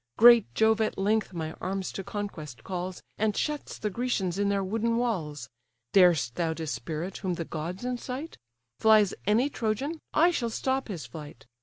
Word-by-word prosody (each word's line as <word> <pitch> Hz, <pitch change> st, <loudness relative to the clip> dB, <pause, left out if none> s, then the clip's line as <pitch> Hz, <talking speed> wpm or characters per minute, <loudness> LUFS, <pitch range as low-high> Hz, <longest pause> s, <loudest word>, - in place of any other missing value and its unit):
Great 235 Hz, -, +8 dB
Jove 220 Hz, 0 st, +4 dB
at 215 Hz, -, 0 dB
length 210 Hz, +2 st, +1 dB
my 160 Hz, -3 st, -4 dB
arms 190 Hz, 0 st, -2 dB
to 195 Hz, -, -5 dB
conquest 160 Hz, -, -6 dB
calls, 180 Hz, 0 st, -5 dB, 0.2 s
And 210 Hz, -1 st, +1 dB
shuts 300 Hz, -1 st, -2 dB
the 210 Hz, -, -2 dB
Grecians 195 Hz, -5 st, -1 dB
in 200 Hz, 0 st, +2 dB
their 200 Hz, -1 st, +1 dB
wooden 225 Hz, +4 st, 0 dB
walls, 155 Hz, -, -2 dB, 0.5 s
Darest 170 Hz, -11 st, +5 dB
thou 165 Hz, -2 st, -1 dB
dispirit 160 Hz, +4 st, -4 dB
whom 185 Hz, -2 st, -2 dB
the 165 Hz, -, -4 dB
gods 170 Hz, +9 st, -5 dB
incite? 250 Hz, +5 st, -4 dB, 0.4 s
Flies 215 Hz, -3 st, +5 dB
any 225 Hz, +6 st, +4 dB
Trojan? 275 Hz, +5 st, -2 dB
I 340 Hz, +3 st, +5 dB
shall 235 Hz, -8 st, -1 dB
stop 265 Hz, +3 st, -1 dB
his 185 Hz, -8 st, -5 dB
flight. 150 Hz, -6 st, -10 dB
200 Hz, 165 wpm, -28 LUFS, 170-230 Hz, 0.5 s, Great